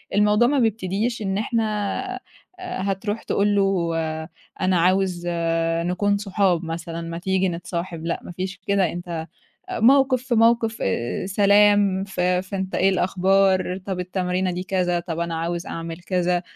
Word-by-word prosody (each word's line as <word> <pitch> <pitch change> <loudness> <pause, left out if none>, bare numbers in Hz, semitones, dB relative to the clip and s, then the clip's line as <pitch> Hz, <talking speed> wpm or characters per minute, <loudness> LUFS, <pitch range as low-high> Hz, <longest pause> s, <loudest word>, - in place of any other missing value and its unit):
الموضوع 210 +3 +4
ما 285 +2 +2
بيبتديش 225 +1 0
إن 195 -2 -1
إحنا 225 +2 0 1.0
آآ 365 - -5
هتروح 200 +3 -2
تقول 205 +1 +1
له 190 -4 +1 0.7
أنا 185 -1 +2
عاوز 185 0 +2 0.6
نكون 200 +3 +1
صحاب 195 -4 0
مثلًا 165 0 -5
ما 165 0 -5
تيجي 190 +1 +1
نتصاحب، 170 -1 -5
لأ 170 - -1
ما - - -8
فيش 185 +2 -5
كده، 195 -4 +2
أنت 175 +1 -7 0.6
آآ - - -3
موقِف 260 +1 +4
في 250 -1 0
موقِف 225 0 +3
آآ 115 - -1
سلام 200 -1 +4
ف 195 -2 -6
فأنت 190 +1 -1
إيه 190 - +3
الأخبار؟ 190 0 +2
طَب 190 -2 -2
التمرينة 180 0 -1
دي 180 +1 -3
كذا 180 -2 0
طَب 170 -1 -5
أنا 170 -1 -2
عاوز 170 +1 -3
أعمل 165 0 -6
كذا، 180 -1 0
190 Hz, 150 wpm, -23 LUFS, 175-205 Hz, 1.0 s, الموضوع